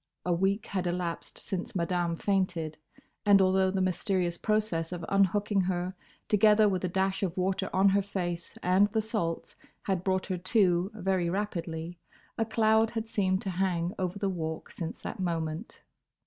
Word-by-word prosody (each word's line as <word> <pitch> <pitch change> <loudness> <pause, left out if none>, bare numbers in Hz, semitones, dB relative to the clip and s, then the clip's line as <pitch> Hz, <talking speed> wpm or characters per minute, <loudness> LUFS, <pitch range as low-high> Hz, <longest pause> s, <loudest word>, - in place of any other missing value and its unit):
A 180 - +2
week 195 +4 +1
had 185 -2 -2
elapsed 175 -1 -3
since 185 0 -5
Madame 175 -1 0
fainted, 175 -5 -1 0.4
and 205 -1 +6
although 190 0 +4
the 190 0 0
mysterious 185 -1 0
process 210 -5 0
of 175 -2 -4
unhooking 200 +1 +2
her, 180 0 -1 0.3
together 210 +1 +5
with 190 -3 0
a - - +1
dash 190 +1 0
of 185 -3 -2
water 185 +1 0
on 195 +1 +4
her 200 +1 +3
face, 175 -3 -4
and 185 +3 +4
the 220 - +2
salts, 210 -7 -2 0.3
had 190 -3 -1
brought 190 -1 0
her 185 -2 -3
to 185 -2 +2
very 190 -3 0
rapidly, 170 -3 -3 0.4
a 225 - 0
cloud 220 0 +3
had 225 -1 -4
seemed 190 -4 0
to 195 - -2
hang 180 -1 0
over 185 +1 -2
the 200 0 -1
Walk 160 -4 -4
since 165 -2 -5
that 230 - -6
moment. 165 +1 -3
185 Hz, 165 wpm, -29 LUFS, 175-200 Hz, 0.4 s, and